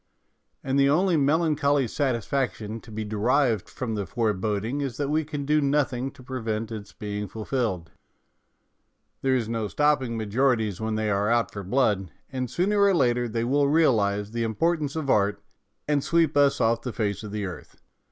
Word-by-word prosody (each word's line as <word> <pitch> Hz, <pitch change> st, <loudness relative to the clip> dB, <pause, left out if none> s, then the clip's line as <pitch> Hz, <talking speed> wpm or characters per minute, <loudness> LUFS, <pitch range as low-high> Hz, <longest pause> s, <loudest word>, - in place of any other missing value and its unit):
And 135 Hz, +1 st, +1 dB
the 140 Hz, 0 st, +5 dB
only 175 Hz, +4 st, +3 dB
melancholy 145 Hz, -2 st, +2 dB
satisfaction 120 Hz, -3 st, -2 dB
to 110 Hz, -, -14 dB
be 110 Hz, 0 st, -4 dB
derived 110 Hz, +1 st, +1 dB
from 125 Hz, -4 st, -4 dB
the 100 Hz, -3 st, -3 dB
foreboding 110 Hz, -, -1 dB
is 135 Hz, -4 st, -3 dB
that 145 Hz, -1 st, -1 dB
we 155 Hz, +1 st, +2 dB
can 145 Hz, -2 st, -5 dB
do 150 Hz, +1 st, +3 dB
nothing 140 Hz, -2 st, 0 dB
to 135 Hz, -2 st, -15 dB
prevent 115 Hz, -3 st, -3 dB
its 110 Hz, -2 st, -7 dB
being 105 Hz, -2 st, -5 dB
fulfilled. 105 Hz, -5 st, -3 dB, 1.3 s
There 135 Hz, -1 st, +2 dB
is 120 Hz, -4 st, 0 dB
no 115 Hz, -2 st, -2 dB
stopping 145 Hz, -3 st, +1 dB
majorities 110 Hz, -1 st, 0 dB
when 110 Hz, 0 st, -1 dB
they 110 Hz, -1 st, 0 dB
are 100 Hz, +1 st, +1 dB
out 120 Hz, 0 st, +2 dB
for 100 Hz, -, -6 dB
blood, 100 Hz, -3 st, +1 dB, 0.2 s
and 130 Hz, -2 st, -3 dB
sooner 200 Hz, -, +1 dB
or 200 Hz, -1 st, +5 dB
later 120 Hz, -5 st, +2 dB
they 115 Hz, +1 st, -1 dB
will 140 Hz, +4 st, +2 dB
realize 105 Hz, -10 st, +2 dB
the 115 Hz, 0 st, -3 dB
importance 150 Hz, +6 st, 0 dB
of 155 Hz, -3 st, -3 dB
art, 100 Hz, 0 st, +2 dB, 0.5 s
and 145 Hz, -2 st, +1 dB
sweep 165 Hz, -3 st, +2 dB
us 140 Hz, -1 st, +4 dB
off 115 Hz, +1 st, +2 dB
the 125 Hz, -1 st, -5 dB
face 100 Hz, -4 st, -2 dB
of 105 Hz, -2 st, -7 dB
the 105 Hz, -1 st, -3 dB
earth. 90 Hz, -2 st, -9 dB
120 Hz, 175 wpm, -26 LUFS, 110-140 Hz, 1.3 s, the